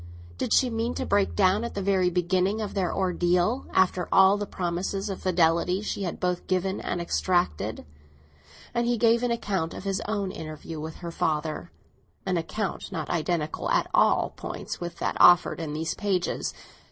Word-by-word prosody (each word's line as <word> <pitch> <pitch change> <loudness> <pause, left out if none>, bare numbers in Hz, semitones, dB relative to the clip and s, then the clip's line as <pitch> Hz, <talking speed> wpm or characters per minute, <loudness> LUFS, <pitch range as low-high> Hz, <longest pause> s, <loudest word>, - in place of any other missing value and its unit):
Did - - -2
she 255 -2 +4
mean 230 +2 -1
to - - -2
break 200 -1 +1
down 195 +2 +3
at 235 - -5
the 200 - -2
very 190 -2 +2
beginning 185 +4 +1
of 210 -2 -4
their 190 -3 0
ordeal, 180 +5 +1
after 185 -1 +2
all 190 +1 +6
the 205 0 -3
promises 190 +3 -2
of 190 - -6
fidelity 180 +1 +2
she 205 - -3
had 180 -3 -3
both 180 -1 -1
given 190 +1 0
and 175 - -2
extracted? 175 - 0 0.9
And 235 0 0
he 240 0 +1
gave 230 +1 +4
an 245 - 0
account 195 -8 -2
of - - -7
his 195 -1 -1
own 205 -3 -1
interview 155 -1 -7
with 155 +1 -6
her 170 - -4
father—an 160 +4 -4
account 175 +4 -3
not 155 -3 -4
identical 165 -2 -1
at - - +2
all - - +3
points - - -6
with 175 0 -5
that - - -2
offered 175 0 +6
in 155 -3 -4
these 160 +1 -2
pages. 195 -4 -1
185 Hz, 175 wpm, -26 LUFS, 170-200 Hz, 0.9 s, all